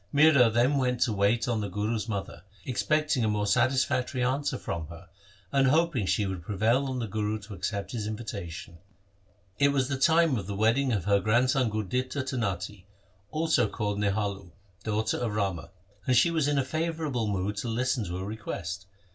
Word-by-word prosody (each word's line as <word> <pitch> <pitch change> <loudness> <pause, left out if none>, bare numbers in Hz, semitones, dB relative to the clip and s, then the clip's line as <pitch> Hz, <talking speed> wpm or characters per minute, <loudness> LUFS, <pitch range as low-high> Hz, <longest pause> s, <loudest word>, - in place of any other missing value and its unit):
Mihra 145 -5 +6
then 125 +5 +3
went 125 -2 0
to 115 - +2
wait 105 +3 +2
on 115 -3 0
the 100 - -3
Guru's 105 +4 -2
mother, 100 -3 -4 0.2
expecting 150 +1 +1
a - - +2
more 105 -1 0
satisfactory 130 +3 +1
answer 135 +2 0
from 80 -8 -4
her, 85 +3 -12 0.4
and 135 -1 +3
hoping 150 - +2
she 105 - +1
would 95 -2 -4
prevail 110 +9 +1
on 130 -1 -3
the 120 - -2
Guru 105 0 -2
to 105 +1 -10
accept 100 +2 -3
his 110 -4 -3
invitation. 100 -6 -6 0.8
It 140 - +5
was 135 -2 +1
the 135 -2 -2
time 160 -1 +4
of 95 -3 -5
the 100 - -4
wedding 115 +6 +2
of 100 -6 -1
her 100 0 +4
grandson 120 +4 +2
Gurditta 125 +6 -2
to 130 - -3
Natti, 100 -3 -3 0.4
also 155 -6 +2
called 105 -2 -2
Nihalo, 100 -3 -2 0.3
daughter 110 0 0
of 115 -4 -2
Rama, 95 -6 -2 0.4
and 130 -1 +4
she 170 +8 +5
was 160 -4 +1
in 145 -1 +1
a 135 - +1
favourable 155 -6 -2
mood 100 +1 -1
to 110 - -3
listen 125 +1 0
to 90 0 -4
a 95 - -4
request. 95 -3 -5
115 Hz, 185 wpm, -28 LUFS, 100-130 Hz, 0.8 s, Mihra